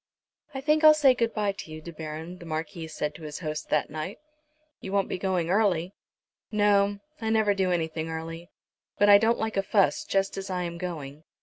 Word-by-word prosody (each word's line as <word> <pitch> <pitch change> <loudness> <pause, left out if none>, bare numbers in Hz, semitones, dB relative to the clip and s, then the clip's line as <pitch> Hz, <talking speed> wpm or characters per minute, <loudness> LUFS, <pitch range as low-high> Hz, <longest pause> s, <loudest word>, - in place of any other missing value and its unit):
"I 265 - -3
think 305 +2 +2
I'll 310 0 +9
say 280 -4 +5
good 230 -2 0
bye 210 -2 0
to 195 -5 -9
you, 155 - -7
De 170 +2 -9
Baron," 160 +3 -7
the 170 - -11
Marquis 160 +1 -4
said 150 -1 -3
to - - -13
his 150 -1 -6
host, 155 -1 -4
that 150 -1 +1
night. 155 +6 -5 0.6
"You 190 - -7
won't 200 -1 +1
be - - -3
going 180 -3 0
early." 190 -3 +2 0.6
"No; 205 -1 +3 0.2
I 220 - -1
never 220 -2 +3
do 190 -2 0
anything 160 -1 -2
early. 165 +2 -6 0.5
But 205 - +4
I 200 0 +9
don't 225 +2 +2
like 220 -2 -2
a - - +4
fuss 200 +8 +2
just 195 -10 0
as 195 0 -5
I 180 -1 -2
am 170 -1 -5
going. 155 -5 -6
185 Hz, 210 wpm, -27 LUFS, 160-205 Hz, 0.6 s, I'll